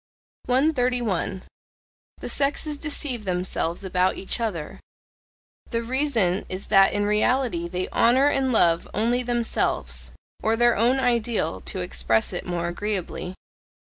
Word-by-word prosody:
131. 245 - 0 0.8
The - - -5
sexes 285 +1 -1
deceive 285 -6 -1
themselves 180 -2 -2
about 185 0 +1
each 195 - -1
other: 190 -10 -4 0.9
the 230 -1 -2
reason 230 -7 +1
is 185 +2 -5
that 195 -1 +6
in 205 0 0
reality 210 -3 +1
they 180 +1 -3
honour 255 +4 +4
and 270 -2 +1
love 170 -7 +3
only 235 +4 +1
themselves 220 - -1 0.3
(or 220 +1 +2
their 240 +1 +4
own 240 +5 +3
ideal, 235 - 0
to - - -2
express 65 - 0
it - - -5
more 170 -1 -2
agreeably). 185 0 -4
215 Hz, 125 wpm, -24 LUFS, 180-250 Hz, 0.9 s, that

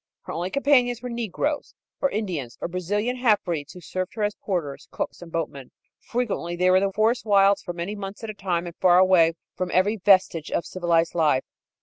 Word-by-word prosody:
Her - - -7
only 175 +3 -2
companions 250 -2 +2
were 250 - -4
negroes, 235 - -3 0.3
or 280 - +3
Indians, 175 - -4
or - - -3
Brazilian 205 +8 -2
halfbreeds 185 - 0
who 180 - -11
served 185 +3 -4
her 215 - -2
as 205 0 +1
porters, 170 -11 -4
cooks - - -5
and 170 -1 -10
boatmen. 145 -6 -4 0.3
Frequently 230 -9 -3
they 180 +1 +3
were 185 - +6
in 195 - +2
the - - -5
forest 220 +4 +1
wilds 200 -2 +4
for 175 - -5
many 175 +4 -4
months 200 +1 -7
at 225 - -5
a - - -10
time 180 -4 -2
and 170 -1 -8
far 180 -1 +5
away 180 -3 +5 0.2
from 185 -1 -2
every 205 +4 +2
vestige 185 -5 +3
of - - -1
civilized 170 -2 +1
life. 150 -6 +2
185 Hz, 205 wpm, -24 LUFS, 170-215 Hz, 0.3 s, were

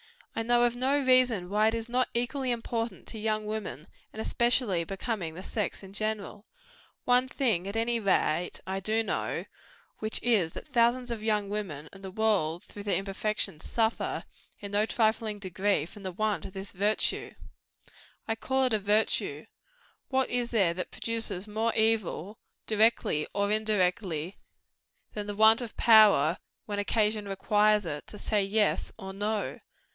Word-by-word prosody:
I 225 - -1
know 240 +1 +3
of 240 0 +2
no 265 +3 +1
reason 255 -8 +3
why 210 +2 +3
it 220 - +1
is 230 0 -3
not 250 +1 0
equally 260 +2 -1
important 230 -3 -3
to 220 - -6
young 215 0 -1
women, 210 - -5 0.3
and 220 - -5
equally 235 -7 +2
becoming 190 -2 -4
the 185 - -8
sex 210 -1 -3
in 195 0 -12
general. 215 0 -3 0.6
One 250 +1 +3
thing, 225 -10 0
at 200 - -5
any 230 +1 +1
rate, 180 -4 0
I 190 +1 -3
do 220 +3 0
know; - - -2 0.5
which 215 0 0
is, 210 -9 +2
that - - -8
thousands 245 -1 +2
of 230 -2 -4
young 210 -2 0
women 180 -8 -4
and 195 0 -13
the 190 - -6
world 185 -5 +1
through 205 - -10
their 200 -1 0
imperfection 195 -3 -1
suffer, 225 +6 -1 0.4
in 200 -1 -7
no 210 +2 +2
trifling 220 -2 0
degree, 190 -3 0
from 205 +5 -12
the 190 -1 -4
want 215 +3 -1
of 190 - -9
this 195 +1 -2
virtue. 205 +3 +1 0.9
I 225 - +1
call 265 +4 0
it 255 -3 +2
a 215 - +2
virtue. 210 +2 +1 0.6
What 265 -1 0
is 245 -1 0
there 195 -7 +2
that 180 +1 -5
produces 225 -5 -2
more 220 +2 -1
evil 220 -2 0 0.3
directly 215 -8 +2
or 200 0 +1
indirectly 190 -5 0 0.7
than 210 -1 -5
the 205 - -4
want 220 +3 +6
of 235 -3 -7
power, 205 -8 +6 0.3
when 205 -1 -3
occasion 210 0 +1
requires 210 +1 +2
it, 150 -3 -5
to 210 - -7
say 210 -1 0
YES, 210 +2 +1
or 190 -3 -7
NO? 205 +2 -2
215 Hz, 165 wpm, -28 LUFS, 195-225 Hz, 0.9 s, want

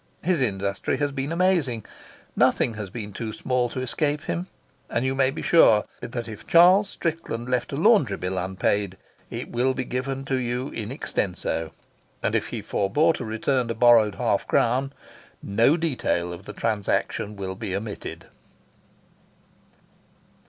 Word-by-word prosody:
His 175 -5 +2
industry 100 +1 -1
has 145 +1 0
been 135 +2 -3
amazing. 165 - +1 0.5
Nothing 115 - +3
has 105 -3 -6
been 105 -1 -7
too 110 +1 -4
small 125 +2 0
to 130 - -4
escape 145 +3 -1
him, 175 +2 -3 0.4
and 115 +3 0
you 130 - +1
may 135 -1 +3
be - - -5
sure 110 -11 +5
that 120 -1 -5
if 110 -2 -9
Charles 185 +4 +6
Strickland 155 -11 -3
left 125 -1 -1
a - - -2
laundry 155 - +4
bill 90 +1 -2
unpaid 95 +1 -1 0.3
it - - -6
will 130 +2 +1
be - - -2
given 135 +2 -3
you, 125 -1 -1 1.5
and - - +1
if - - 0
he - - -5
forebore 150 +12 +2
to - - -5
return 115 +3 0
a 115 - -2
borrowed 115 -3 +5
half - - 0
crown 130 +4 +2 0.5
no 115 +10 +3
detail 125 - -1
of 90 +3 -10
the - - -7
transaction 105 0 -1
will 95 -2 -4
be 95 -1 -4
omitted. 105 +1 -6
120 Hz, 145 wpm, -25 LUFS, 105-140 Hz, 1.5 s, Charles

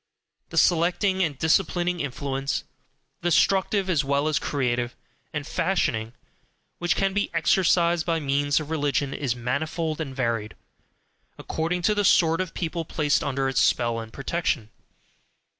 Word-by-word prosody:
The - - -6
selecting 180 +3 +3
and 155 -6 0
disciplining 175 +3 +1
influence 140 -1 -2 0.6
destructive, 190 +3 +2
as 165 -6 +2
well 140 +2 +1
as 155 -3 +1
creative 125 -3 -1 0.4
and 150 -1 -4
fashioning 125 -10 -1 0.7
which 175 0 +1
can 195 -1 +1
be 205 +1 0
exercised 170 0 +3
by 165 -1 0
means 145 0 +1
of 155 0 -7
religion 145 -3 0
is 135 -4 -2
manifold 155 +6 -2
and 135 -4 -5
varied, 115 -4 -2 0.8
according 170 +2 -2
to 210 - +3
the 205 0 0
sort 165 -3 +4
of 185 -3 -5
people 170 -1 -2
placed 150 -2 0
under 135 -1 -1
its 135 - +1
spell 120 -1 +2
and 110 0 -8
protection. 135 -5 -2
155 Hz, 140 wpm, -25 LUFS, 135-175 Hz, 0.8 s, sort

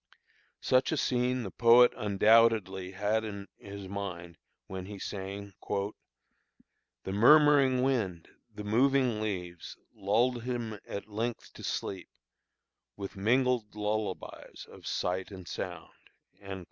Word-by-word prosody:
Such 130 +1 +2
a 160 - 0
scene 125 -1 +1
the 95 - -6
poet 120 +1 +6
undoubtedly 105 -3 +3
had 105 +3 0
in 100 -2 -6
his 100 -1 -8
mind 90 -4 -6 0.3
when 95 -1 -7
he 105 0 -7
sang: 100 +1 -6 1.5
"The 95 - -4
murmuring 135 +3 +6
wind, 105 -11 -1 0.3
the 105 - -6
moving 125 +1 +2
leaves 90 -5 -5 0.2
Lull'd 115 +4 +1
him 115 -3 -4
at 100 - -6
length 115 +3 -4
to - - -11
sleep, 95 -2 -4 0.9
With 100 -1 -6
mingled 120 +1 +1
lullabies 105 -2 -4
of - - -12
sight 90 +1 -2
and 95 -3 -10
sound." - - -6
105 Hz, 115 wpm, -30 LUFS, 95-120 Hz, 1.5 s, poet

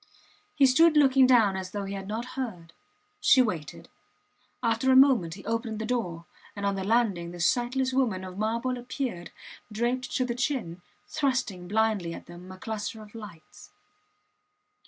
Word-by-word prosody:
He 285 -3 +5
stood 310 +5 +5
looking 270 -2 +5
down 225 -6 +4
as 190 -1 -5
though 205 +1 -4
he 195 - -5
had 195 -1 -6
not 220 +3 -3
heard. 190 -11 -6 0.5
She 270 - +5
waited. 180 - -1 0.8
After 230 +3 +2
a - - +5
moment 255 -12 +5
he 195 - -13
opened 225 0 -2
the 220 - -4
door, 180 -9 -3 0.3
and, 200 -1 -4
on 200 - +1
the 195 -1 -3
landing, 200 -5 +1
the 175 0 -9
sightless 255 +8 +1
woman 230 -8 0
of 185 -1 -8
marble 230 +4 -1
appeared, 245 -7 -5 0.4
draped 240 +4 -1
to 255 - +1
the 240 - -2
chin, 240 - -3 0.3
thrusting 250 - -1
blindly 210 -5 0
at - - -11
them 175 +2 -12
a 185 - -10
cluster 215 +1 -5
of 210 - -16
lights. 210 -8 -12
220 Hz, 165 wpm, -27 LUFS, 190-255 Hz, 0.8 s, He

